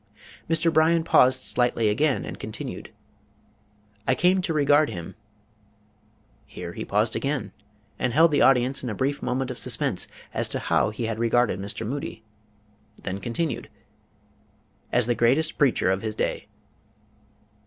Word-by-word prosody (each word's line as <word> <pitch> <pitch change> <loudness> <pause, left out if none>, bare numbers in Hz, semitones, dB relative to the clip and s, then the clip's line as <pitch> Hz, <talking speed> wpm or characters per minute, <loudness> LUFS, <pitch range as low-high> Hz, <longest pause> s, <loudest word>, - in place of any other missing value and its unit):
Mr. 165 0 +2
Bryan 160 +1 +4
paused 130 -5 +4
slightly 120 -2 +1
again 140 +7 +1
and - - -7
continued: - - -7 1.2
"I 130 - +3
came 180 +7 +3
to 180 - -2
regard 145 0 +3
him" 85 -1 -7 1.3
here - - -8
he - - -5
paused 105 +2 0
again 140 -5 -2 0.5
and 125 - 0
held 160 +5 +5
the 145 - +2
audience 130 0 +3
in 125 - -3
a 105 - -4
brief 140 +6 -1
moment 130 +1 -2
of 125 - -8
suspense - - -2 0.3
as - - -1
to - - 0
how - - +1
he 110 +2 -4
had 110 0 -3
regarded 115 -2 +2
Mr. 100 +3 -4
Moody, 125 -2 -5 0.8
then 95 0 -4
continued 130 - -3 1.2
"as 125 -2 +3
the 120 - +2
greatest 130 +7 +1
preacher 130 -9 +3
of 95 0 -1
his 110 -1 -4
day." - - -2
125 Hz, 145 wpm, -25 LUFS, 115-150 Hz, 1.3 s, held